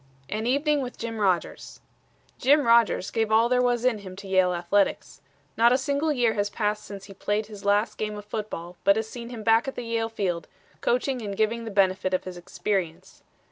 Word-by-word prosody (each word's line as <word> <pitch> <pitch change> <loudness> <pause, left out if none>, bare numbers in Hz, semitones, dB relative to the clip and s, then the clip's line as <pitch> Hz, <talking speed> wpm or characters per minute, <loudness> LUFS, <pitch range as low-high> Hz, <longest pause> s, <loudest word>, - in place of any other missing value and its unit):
AN 220 +2 -2
EVENING 285 +3 +2
WITH 250 -1 -6
JIM 230 -1 -5
RODGERS 185 -4 -1 0.6
Jim 285 +3 +4
Rodgers 230 -5 +3
gave 225 -2 0
all 225 +2 +5
there 250 +1 +2
was 245 -1 +1
in 240 -4 +2
him 190 -2 -9
to 200 +1 -10
Yale 185 -1 +3
athletics. 180 +3 0 0.3
Not 235 +1 +5
a 255 - +4
single 285 +3 0
year 240 -5 +2
has 205 -1 -1
passed 210 0 -2
since 200 -1 -9
he 195 - -11
played 205 +2 -1
his 205 -2 -11
last 205 +2 +1
game 210 -1 -3
of 205 - -9
football 195 -5 -6
but 200 - +5
has 220 0 -2
seen 235 +1 -8
him 235 -3 -7
back 225 +3 +4
at 270 - -4
the 245 - -5
Yale 230 -1 -1
field, 180 -7 -2 0.3
coaching 250 +1 0
and 200 -2 -5
giving 230 +2 0
the - - -4
benefit 190 -2 +2
of - - -2
his 185 -1 -7
experience. 175 -1 -4
215 Hz, 210 wpm, -26 LUFS, 200-235 Hz, 0.6 s, all